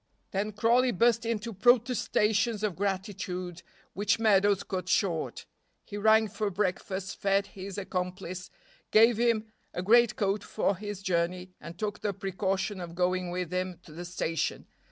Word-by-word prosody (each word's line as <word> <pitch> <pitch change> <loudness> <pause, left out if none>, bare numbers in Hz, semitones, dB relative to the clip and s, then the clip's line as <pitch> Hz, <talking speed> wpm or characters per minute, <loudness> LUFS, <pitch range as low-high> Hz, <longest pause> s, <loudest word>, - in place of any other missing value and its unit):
Then 205 +2 -1
Crawley 235 +4 +3
burst 230 +2 +2
into 230 0 -2
protestations 220 -1 +2
of 205 -5 0
gratitude 185 -2 -3 0.3
which 205 +3 +1
Meadows 205 -2 +3
cut 185 -2 -4
short. 175 -5 0 0.4
He 205 - -8
rang 220 +1 +4
for 210 +1 -2
breakfast, 190 0 -2
fed 195 0 +2
his 195 0 -8
accomplice, 180 -2 -4 0.4
gave 225 +1 +6
him 225 -2 +1 0.2
a 180 - -2
great 235 +3 +5
coat 200 -1 0
for 200 - 0
his 205 0 -6
journey, 180 0 -1
and 170 +1 -9
took 210 +1 -3
the 205 -2 -1
precaution 195 0 -2
of 170 -1 -7
going 180 0 0
with 180 -1 -3
him 185 -1 -2
to - - -14
the 170 +3 -7
station. 165 -2 -2
195 Hz, 150 wpm, -29 LUFS, 185-215 Hz, 0.4 s, gave